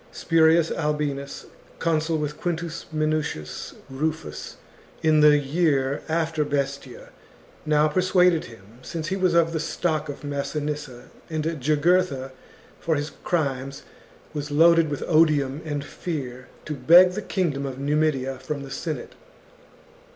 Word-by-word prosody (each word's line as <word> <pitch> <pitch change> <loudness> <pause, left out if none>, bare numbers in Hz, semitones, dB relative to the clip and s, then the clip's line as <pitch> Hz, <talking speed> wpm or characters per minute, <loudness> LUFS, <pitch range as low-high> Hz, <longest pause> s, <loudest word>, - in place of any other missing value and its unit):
Spurius 165 0 +3
Albinus, 150 -3 -2 0.3
consul 160 0 0
with 150 0 -4
Quintus 170 -1 -3
Minucius 155 - -2
Rufus 135 - -4 0.5
in 155 -1 +4
the 150 0 +7
year 140 -2 +1
after 160 -1 0
Bestia, 140 -3 -3 0.6
now 150 0 +4
persuaded 180 0 +3
him, 115 +1 -15
since 160 +4 -5
he 190 - 0
was 185 -3 +1
of 165 -1 +3
the 160 - -1
stock 160 -1 -1
of 145 - -7
Massinissa, 145 -2 -4 0.2
and 155 -1 -2 0.2
Jugurtha 150 -1 +2 0.5
for 165 -2 0
his 145 +1 -3
crimes 135 -5 -2 0.5
was 150 -1 -4
loaded 165 +2 +5
with 145 - -3
odium 155 -3 +3
and 145 -2 -3
fear, 130 -7 -6 0.2
to 155 - -3
beg 170 +7 +7
the 205 +4 -4
kingdom 150 -10 -1
of 130 -1 -6
Numidia 140 -2 0
from 140 +2 -5
the 135 - -9
Senate. 155 +3 -5
150 Hz, 130 wpm, -24 LUFS, 140-165 Hz, 0.6 s, the